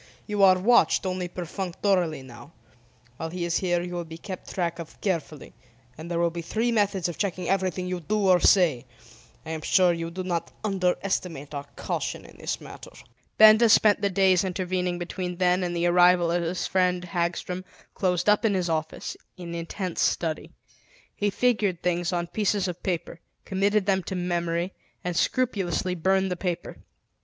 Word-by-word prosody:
You 210 -2 -1
are 190 -1 +7
watched 210 +1 +4
only 185 -1 -2
perfunctorily 180 -2 -1
now. 120 +4 -13 0.6
While 165 - -4
he 175 +1 -3
is 170 0 +1
here 175 -2 0
you 180 0 -6
will 175 -1 -3
be 165 0 -10
kept 185 +2 -8
track 170 -2 -2
of 165 - -9
carefully, 165 -6 -3 0.4
and 160 +4 -9
there 170 - -1
will 170 0 +2
be 170 0 -5
three 225 +8 -1
methods 205 -5 +1
of 175 - -6
checking 185 -3 -2
everything 185 -1 0
you 180 0 -3
do 200 +5 0
or 180 -1 +6
say. 170 - +4 0.6
I 160 - -5
am 160 -1 -4
sure 180 +2 +4
you 165 0 -4
do 185 +2 -5
not 175 -2 -2
underestimate 180 -6 -1
our 140 -1 -5
caution - - -3
in - - -15
this - - -3
matter." - - -11 0.5
Benda 220 +2 +8
spent 210 -1 +5
the 200 - +2
days 190 -1 +3
intervening 180 -1 -2
between 180 +1 -4
then 180 0 +2
and 175 -1 -2
the 170 0 0
arrival 175 -1 +5
of 175 0 +1
his 170 +1 -2
friend 180 -1 +1
Hagstrom, 180 +1 -2 0.3
closed 180 -2 0
up 210 +2 +4
in 215 -3 +2
his 180 -2 0
office, 160 0 -3 0.2
in 170 -2 -7
intense 170 +2 -4
study. 160 -2 0 0.7
He 205 - 0
figured 205 -5 +1
things 175 0 0
on 175 -1 -1
pieces 200 +2 0
of 180 -1 -5
paper, 175 -2 -3 0.3
committed 200 +1 +1
them 190 -1 +2
to 190 - -4
memory, 175 0 -1 0.3
and 180 -1 -2
scrupulously 190 -6 0
burned 190 +2 +1
the - - 0
paper. 175 -1 -4
180 Hz, 175 wpm, -26 LUFS, 170-190 Hz, 0.7 s, Benda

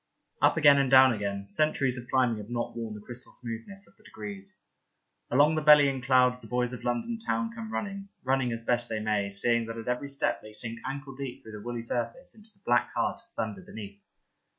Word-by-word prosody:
Up - - +4
again 145 -3 +7
and 135 -2 +2
down 130 -1 +8
again: 100 -2 -3
centuries 135 +1 +1
of 120 -1 -7
climbing 125 -4 +2
have 105 +1 -8
not 120 -1 -3
worn 115 -2 -5
the - - -8
crystal 125 0 -7
smoothness 120 - -8
of - - -23
the - - -25
degrees. 100 -2 -8 0.7
Along 145 +5 +5
the 155 - 0
bellying 145 -3 +6
clouds 125 0 +4
the - - -12
little 125 - -2
boys 125 0 0
of 125 - -7
London 120 - -1
Town 230 +1 -1
come 225 -1 -7
running, 200 -2 -4
running 130 -1 +1
as 115 0 -4
best 120 0 0
they 110 -1 -2
may, 105 -2 0
seeing 115 +3 +1
that 115 0 -6
at 115 - -7
every 125 +3 -1
step 140 - 0
they 110 0 -12
sink 115 +1 -3
ankle 140 -1 -5
deep 135 -2 -7
through 110 - -10
the 105 -1 -8
woolly 120 +1 -4
surface 115 0 -3
into 215 0 -13
the 195 -2 -33
black 120 0 +3
heart - - -1
of - - -31
thunder 105 -3 -3
beneath. 100 -1 -10
120 Hz, 220 wpm, -29 LUFS, 115-140 Hz, 0.7 s, down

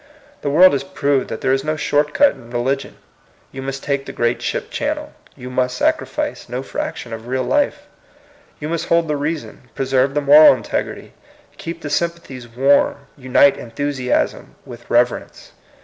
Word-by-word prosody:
The 145 - -1
world 175 +5 +6
has 140 -1 0
proved 140 -1 0
that - - -5
there 130 - +2
is 135 0 0
no 155 +1 -1
short 150 0 +1
cat 285 -1 +5
in 120 -3 -14
religion. 130 +3 -2 0.5
You 135 - -7
must 135 0 -5
take 140 -1 -2
the - - -5
great 120 0 -1
ship - - -3
channel; - - -3 0.2
you 125 +1 -9
must 125 0 0
sacrifice - - -1
no 125 +2 -4
fraction 120 -3 -5
of 115 +1 -8
real 130 +1 -1
life; 290 -1 0 0.7
you 150 - -4
must 165 0 -3
hold 170 -1 +2
the 150 - 0
reason, 145 -3 -5
preserve 135 +1 +1
the - - +3
moml 145 -1 +8
integrity, 115 - -4 0.5
keep 165 0 -6
the 145 - -4
sympathies 170 -7 -3
warm, 140 +3 +2
unite 135 +1 +3
enthusiasm 130 +1 -2
with 120 -1 -12
reverence. 120 +1 0
135 Hz, 165 wpm, -19 LUFS, 125-150 Hz, 0.7 s, moml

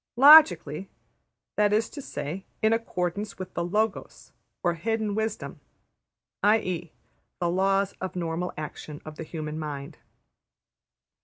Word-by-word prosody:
``Logically''; 220 - +7 0.7
that 205 -1 +4
is 215 +2 +2
to 290 - -7
say, 155 - -5 0.2
in 220 +1 +5
accordance 205 -2 -2
with 185 -1 -7
the - - -2
``Logos'' 210 +4 -2 0.3
or 175 -2 +2
hidden 220 +4 -1
wisdom, 220 0 -3 0.8
\textit{i.e.} 185 -6 +1 0.5
the 175 - 0
laws 195 +2 +2
of 185 -2 -4
normal 170 0 -2
action 150 -1 -7
of 155 0 -9
the - - -5
human 155 -1 -5
mind. 150 0 -6
185 Hz, 125 wpm, -27 LUFS, 165-210 Hz, 0.8 s, ``Logically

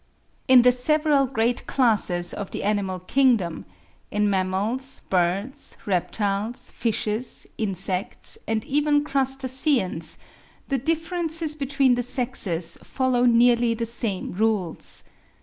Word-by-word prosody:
In 255 -2 +7
the 250 - +6
several 290 +2 +2
great 240 -1 -1
classes 205 -9 +1
of 200 - -5
the - - -5
animal 200 -3 -1
kingdom,—in 190 - -1
mammals, 200 +8 -2
birds, 195 +10 -1
reptiles, 205 +5 -2
fishes, 225 +1 -2
insects, 195 +1 -1
and 220 -1 -1
even 290 +1 +2
crustaceans,—the 265 - -1
differences 325 +1 -1
between 275 -3 +2
the 245 - 0
sexes 240 -9 +1
follow 255 -2 0
nearly 235 0 +4
the 230 0 -2
same 225 -4 -3
rules. 205 -4 -1
235 Hz, 100 wpm, -24 LUFS, 195-265 Hz, -, In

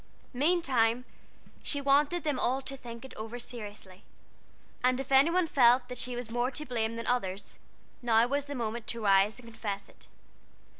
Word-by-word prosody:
Meantime 255 -5 +2 0.6
she 285 - -2
wanted 285 +5 +2
them 295 -4 0
all 255 +2 +1
to 275 0 -7
think 235 -2 -9
it 265 - -11
over 225 +2 -6
seriously; 210 -6 -9 0.8
and 255 0 +3
if 270 +1 -6
any 270 +4 +6
one 360 +1 +2
felt 250 -4 +4
that 250 - -6
she 250 -1 -2
was 240 -2 -6
more 240 +2 +1
to 300 +3 -7
blame 230 -4 -1
than 230 0 -5
the - - +2
others, 195 -5 -3 0.4
now 230 -1 +4
was 280 +3 -1
the 285 0 -6
moment 230 -2 -3
to 235 - -4
rise 195 +1 +4
and 245 -2 -13
confess 210 -3 -5
it. - - -20
245 Hz, 185 wpm, -30 LUFS, 225-275 Hz, 0.8 s, any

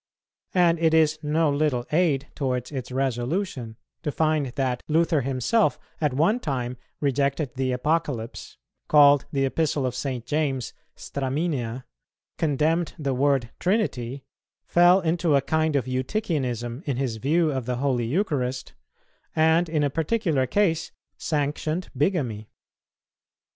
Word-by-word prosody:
And 170 -2 +4
it 160 -1 +3
is 155 -1 +3
no 155 0 +1
little 140 -4 0
aid 150 -4 +2
towards 125 -2 -2
its 130 -3 -5
resolution 130 - -2 0.2
to 150 - -2
find 155 -2 +1
that 130 -1 -2
Luther 160 -1 +2
himself 135 - +1 0.2
at 150 -2 +2
one 175 - +3
time 125 - -3 0.2
rejected 140 0 0
the 130 0 -1
Apocalypse, 130 -3 -2 0.3
called 145 -2 +6
the 135 -3 +1
Epistle 145 0 0
of 125 - -1
St. 125 -2 -4
James 135 -2 -1 0.2
"straminea," 135 -3 -2 0.6
condemned 160 +2 +1
the 140 -3 -1
word 135 -2 +1
"Trinity," 140 - -1 0.4
fell 175 +2 +5
into 165 -2 +1
a - - +5
kind 160 +1 +1
of 140 - +1
Eutychianism 130 - -2
in 135 -4 -1
his 125 -4 -2
view 155 +7 +2
of 130 -3 -3
the 125 - 0
Holy 125 -3 0
Eucharist, 135 - -1 0.6
and 160 +2 +3
in 155 -2 +1
a 145 - +1
particular 160 - 0
case 165 +1 +1 0.2
sanctioned 155 +3 -2
bigamy. 130 - -1
145 Hz, 130 wpm, -25 LUFS, 130-160 Hz, 0.6 s, called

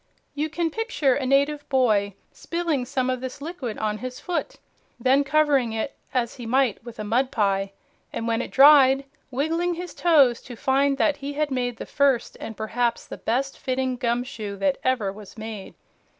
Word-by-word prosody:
You 300 +2 -2
can 330 +1 -1
picture 320 - +1
a 260 0 -2
native 285 +2 +1
boy 215 -7 +2 0.2
spilling 335 -7 -2
some 255 0 -1
of 255 -1 -3
this 260 +1 -6
liquid 285 -7 -5
on 215 -1 -2
his 255 0 -6
foot, 355 -1 -3 0.4
then 260 +4 +3
covering 280 -5 +2
it, 225 +5 -3 0.2
as 250 -3 -1
he 240 -2 -7
might 255 -3 +1
with 240 -1 -10
a 215 - -4
mud 245 +5 +1
pie, 195 -4 0 0.4
and 230 - -4
when 230 +1 +1
it - - -5
dried 275 -1 +7 0.2
wiggling 325 +7 0
his 355 +1 -6
toes 280 -9 +4
to 245 - -10
find 275 +3 +2
that, 290 +1 +2
he 285 0 -5
had 300 +1 0 0.3
the - - -7
first 275 -4 +1
and 220 - -7
perhaps 235 +2 -1
the - - -8
best 270 +4 -2
fitting 260 -1 -1
gum 240 0 0
shoe 220 -6 -6
that 280 +6 0
ever 235 -7 0
was 210 +1 -13
made. 220 -2 -7
260 Hz, 180 wpm, -24 LUFS, 230-285 Hz, 0.4 s, dried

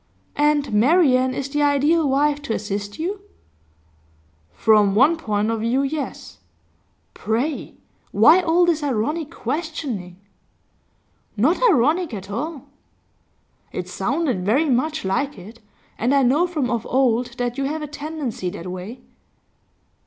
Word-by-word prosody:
'And 295 -4 +1
Marian 255 +1 +3
is 275 - -3
the 295 +1 -1
ideal 290 +2 +3
wife 290 +2 +1
to 230 -6 -3
assist 205 0 -4
you?' 385 +5 -3 1.3
'From 210 -3 +3
one 275 +9 +5
point 215 -8 -1
of 225 - -2
view, 245 +5 +1
yes. 285 +1 -5 0.7
Pray, 250 +8 -2 0.4
why 310 - +6
all 350 0 +3
this 335 -3 +1
ironic 290 +4 -1
questioning?' 265 - -4 1.2
'Not 295 - +2
ironic 305 - +2
at 195 0 -8
all.' 285 +5 -4 1.1
'It 180 - -5
sounded 245 - -1
very 270 - +2
much 300 +2 0
like 245 +8 -1
it, 215 +6 -12 0.4
and 250 +5 +2
I 275 - +4
know 290 +8 +3
from 300 -8 -2
of 235 -2 -1
old 250 -2 +1
that 245 +1 -2
you 275 - 0
have 305 +2 -3
a - - -4
tendency 290 - -5
that 180 +1 -7
way. 205 +8 -8
270 Hz, 130 wpm, -22 LUFS, 220-305 Hz, 1.3 s, why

